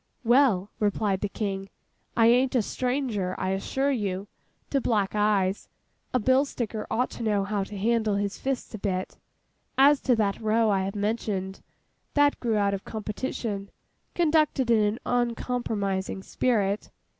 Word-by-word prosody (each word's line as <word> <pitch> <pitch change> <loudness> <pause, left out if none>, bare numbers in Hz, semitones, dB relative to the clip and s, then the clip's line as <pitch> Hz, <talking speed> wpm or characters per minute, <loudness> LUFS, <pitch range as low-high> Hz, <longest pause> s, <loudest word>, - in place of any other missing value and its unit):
'Well,' 235 -6 +3
replied 205 -2 0
the 205 - -1
King, 195 -2 -3 0.5
'I 230 - +6
an't 250 +3 +4
a 240 - +3
stranger, 245 -7 -1
I 185 - -1
assure 270 +8 0
you, 200 -5 -2 0.4
to 275 - +2
black 205 -5 +1
eyes; 205 -2 +1 0.4
a - - +2
bill 260 +3 +4
sticker 230 -6 -4
ought 245 +3 0
to - - -8
know 210 -3 +1
how 200 0 -1
to 205 +1 -8
handle 220 0 +1
his 200 0 -2
fists 270 -3 -3
a 220 - -5
bit. 185 -2 -3 0.6
As 280 +1 +6
to 250 - +3
that 205 -2 0
row 220 0 +2
I 190 -1 +1
have 195 +2 -4
mentioned, 205 -2 -2 0.5
that 290 0 +4
grew 230 -3 0
out 200 -1 +2
of 195 - -4
competition, 215 -2 -4 0.5
conducted 305 -6 +2
in 225 - +5
an 210 +3 0
uncompromising 225 -6 -1
spirit. 210 -5 0
215 Hz, 155 wpm, -27 LUFS, 200-245 Hz, 0.6 s, I